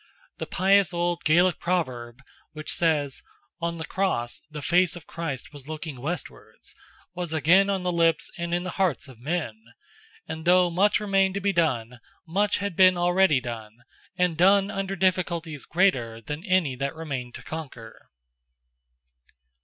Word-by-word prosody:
The - - -4
pious 190 -1 +3
old 175 0 -1
Gaelic 175 +4 +4
proverb, 130 -9 -2 0.3
which 155 -1 -4
says, 150 -5 0 0.4
"on 170 0 -2
the 160 - -5
Cross 175 -12 -2
the 150 -2 -7
face 180 0 +3
of 170 -3 -10
Christ 155 -5 -6
was 145 -2 -11
looking 155 -4 -6
westwards—," 170 +6 -6 0.4
was 175 -2 -4
again 180 +6 +4
on 195 -2 -1
the 180 - 0
lips 165 -1 +1
and 170 -2 -4
in 175 +1 0
the 185 - -4
hearts 170 -8 0
of 130 -4 -14
men, 135 -6 -3 0.7
and 160 +1 -6
though 180 0 +5
much 200 +6 +3
remained 195 -2 +1
to - - 0
be 200 0 0
done, 125 -8 0 0.3
much 200 +5 +1
had 200 -3 -3
been 185 0 +6
already 175 -4 +3
done, 115 -2 -8 0.3
and 180 -3 +1
done 195 +2 +5
under 195 -1 -3
difficulties 170 -5 -1
greater 130 -12 +1
than 150 +8 -6
any 185 - +2
that 140 +4 -3
remained 135 -7 -5
to - - -9
conquer. 130 -8 -9
170 Hz, 155 wpm, -25 LUFS, 140-185 Hz, 0.7 s, been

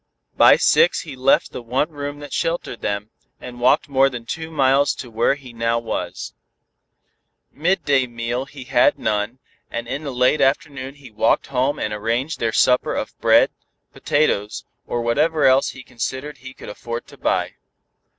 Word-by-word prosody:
By - - +7
six 480 +2 +3
he 145 -5 -9
left 130 +1 +2
the - - -6
one 130 +7 -1
room 145 0 -6
that 145 -2 -9
sheltered 165 -7 -2
them, 100 +1 -3 0.3
and 125 -1 -10
walked 130 +6 +3
more 135 -1 +3
than 120 -3 -8
two 160 +6 -5
miles 140 -2 +2
to 125 - -9
where 115 +5 +2
he 130 -4 -13
now 115 0 0
was. 115 -1 -4 1.2
Midday 145 -5 +1
meal 120 +2 -3
he 135 -2 -11
had 125 -1 +3
none, 105 +3 -1 0.3
and 115 0 -5
in 135 +5 -4
the 140 - -4
late 125 +4 +2
afternoon 135 0 0
he 135 -4 -14
walked 110 +1 +1
home 130 +3 +1
and 105 - -3
arranged 115 +8 -2
their 115 -1 0
supper 125 +3 +2
of - - -4
bread, - - +5 0.4
potatoes, 110 -9 0 0.2
or 120 -1 -2
whatever 150 +6 +2
else 130 +1 +4
he 130 - -10
considered 130 +4 -5
he 130 +1 -11
could - - -10
afford 115 +3 -6
to - - -15
buy. - - 0
130 Hz, 170 wpm, -21 LUFS, 115-145 Hz, 1.2 s, By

